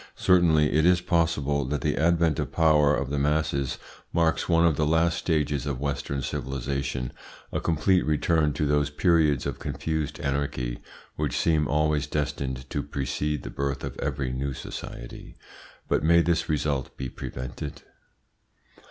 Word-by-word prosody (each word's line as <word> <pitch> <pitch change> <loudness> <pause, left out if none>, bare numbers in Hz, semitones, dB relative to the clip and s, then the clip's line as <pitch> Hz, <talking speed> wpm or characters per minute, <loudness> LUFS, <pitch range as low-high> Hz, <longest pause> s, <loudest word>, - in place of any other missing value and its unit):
Certainly 85 -5 +4
it 80 +1 +3
is 90 +1 +5
possible 80 -5 +1
that 70 +1 -2
the - - 0
advent 85 -2 +2
to - - -1
power 75 -3 +4
of 70 -1 -3
the 70 - 0
masses 70 -2 0 0.3
marks 85 0 +1
one 85 0 +4
of 80 -3 +3
the 75 +1 +1
last 80 +1 +3
stages 75 -4 0
of 70 -3 -2
Western 70 -1 -2
civilisation, 65 0 -3 0.4
a - - -1
complete 85 +3 +2
return 75 0 +2
to 75 - -1
those 75 0 +2
periods 75 -3 +2
of - - -3
confused 80 -2 -3
anarchy 70 -4 -2 0.4
which 75 -5 -1
seem 80 -3 +2
always 75 -1 +1
destined 65 -4 -3
to - - -1
precede 75 +2 -2
the - - -6
birth 70 0 -3
of - - -5
every 70 -2 -2
new 70 +2 -2
society. - - -8 0.5
But - - +1
may 85 +2 +5
this 85 -1 0
result 75 -3 -1
be 65 - -3
prevented? 65 +3 -7
75 Hz, 150 wpm, -26 LUFS, 70-80 Hz, 0.5 s, is